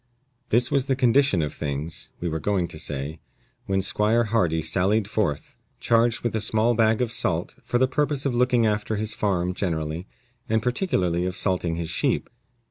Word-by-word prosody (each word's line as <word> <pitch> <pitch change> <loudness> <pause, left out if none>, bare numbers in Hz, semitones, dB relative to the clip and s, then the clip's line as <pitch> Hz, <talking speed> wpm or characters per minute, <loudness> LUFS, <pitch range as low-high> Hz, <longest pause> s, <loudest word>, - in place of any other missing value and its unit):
This 120 +2 +3
was 135 -1 +1
the 135 - +2
condition 125 - +3
of 75 - -3
things 75 +2 -4
(we 90 - -3
were 80 -1 -2
going 95 0 0
to 80 - -6
say) 75 +3 -4 0.5
when 95 0 0
Squire 110 +4 +2
Hardy 100 -8 +1
sallied 95 +6 +1
forth, 100 -10 -2 0.2
charged 115 0 +2
with 120 -2 -2
a 110 - 0
small 110 +3 +2
bag 110 +1 +2
of 120 - -3
salt, 90 -7 -1
for 120 - 0
the 130 +1 +3
purpose 145 +1 0
of 135 - +1
looking 125 -1 +3
after 105 0 0
his 110 +1 0
farm 90 -3 0
generally, 80 -1 -3 0.4
and 110 0 +1
particularly 95 - 0
of 90 - -4
salting 90 -4 0
his 85 -1 -4
sheep. - - 0
105 Hz, 180 wpm, -24 LUFS, 85-120 Hz, 0.5 s, This